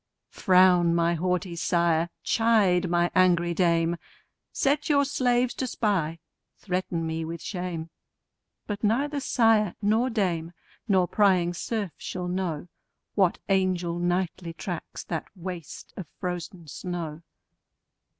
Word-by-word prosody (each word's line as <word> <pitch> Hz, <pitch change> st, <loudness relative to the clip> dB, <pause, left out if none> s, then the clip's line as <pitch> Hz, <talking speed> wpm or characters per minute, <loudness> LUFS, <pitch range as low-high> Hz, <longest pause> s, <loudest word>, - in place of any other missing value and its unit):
Frown, 180 Hz, -3 st, +4 dB
my 170 Hz, 0 st, +2 dB
haughty 180 Hz, +1 st, -1 dB
sire! 170 Hz, -1 st, +1 dB
chide, 205 Hz, -6 st, +3 dB
my 175 Hz, 0 st, +2 dB
angry 175 Hz, -2 st, +3 dB
dame! 170 Hz, -1 st, +2 dB, 0.5 s
Set 285 Hz, +3 st, 0 dB
your 285 Hz, -1 st, +4 dB
slaves 250 Hz, -3 st, +1 dB
to 260 Hz, -, -3 dB
spy; 190 Hz, -9 st, 0 dB, 0.4 s
threaten 180 Hz, -3 st, -2 dB
me 160 Hz, 0 st, -2 dB
with 165 Hz, +1 st, -5 dB
shame: 175 Hz, -4 st, -5 dB, 0.7 s
But 205 Hz, 0 st, -5 dB
neither 280 Hz, +7 st, +1 dB
sire 225 Hz, -7 st, +3 dB
nor 220 Hz, +5 st, +2 dB
dame, 175 Hz, -7 st, -1 dB, 0.3 s
nor 190 Hz, -4 st, +3 dB
prying 180 Hz, -3 st, +3 dB
serf 205 Hz, +1 st, -3 dB
shall 180 Hz, -1 st, -5 dB
know, 180 Hz, -3 st, -2 dB, 0.5 s
What 190 Hz, -4 st, +3 dB
angel 185 Hz, -3 st, +1 dB
nightly 175 Hz, -1 st, -1 dB
tracks 175 Hz, 0 st, -6 dB
that 165 Hz, -2 st, -4 dB
waste 175 Hz, -4 st, -8 dB
of 185 Hz, -, -7 dB
frozen 180 Hz, -2 st, -5 dB
snow. 165 Hz, -1 st, -5 dB
180 Hz, 120 wpm, -26 LUFS, 170-205 Hz, 0.7 s, Frown